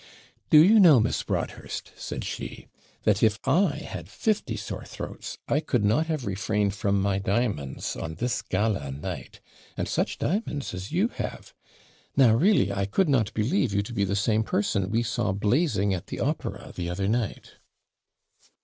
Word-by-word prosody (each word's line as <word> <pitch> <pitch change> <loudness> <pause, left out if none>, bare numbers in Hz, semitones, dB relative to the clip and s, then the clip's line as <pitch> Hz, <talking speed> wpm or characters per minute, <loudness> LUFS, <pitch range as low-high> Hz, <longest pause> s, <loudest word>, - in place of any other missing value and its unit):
'Do 150 - +8
you 215 +5 +6
know, 165 - +8
Miss 110 - +1
Broadhurst,' - - -4
said - - -5
she, - - -6 0.4
'that 105 -1 +2
if 110 -1 +4
I 165 +2 +3
had 85 -1 -7
fifty 195 - -1
sore 100 - -5
throats, - - -7
I 145 - +2
could 125 -8 0
not 150 +11 +2
have 155 -5 -2
refrained 100 +1 0
from 100 -1 0
my 100 0 +1
diamonds 100 - -1
on 80 0 -5
this 120 +4 -1
GALA 95 -7 -1
night; 70 - -7 0.4
and - - -1
such - - -1
diamonds 160 -6 -2
as 95 +5 -6
you 190 +8 +2
have! - - -6 0.6
Now, 125 -5 +6
really, 155 - +3
I 100 0 -1
could 160 - +1
not 115 -7 +2
believe 115 - +1
you 100 - +2
to 120 - -8
be 100 - +1
the 100 0 0
same 105 +1 +2
person 100 -3 0
we 115 +3 +1
saw 120 -4 -1
blazing 105 - +1
at 90 - -4
the - - -6
opera - - -3
the 85 -1 -3
other 95 +2 -1
night!' 110 -1 -2
110 Hz, 170 wpm, -26 LUFS, 100-140 Hz, 0.6 s, Do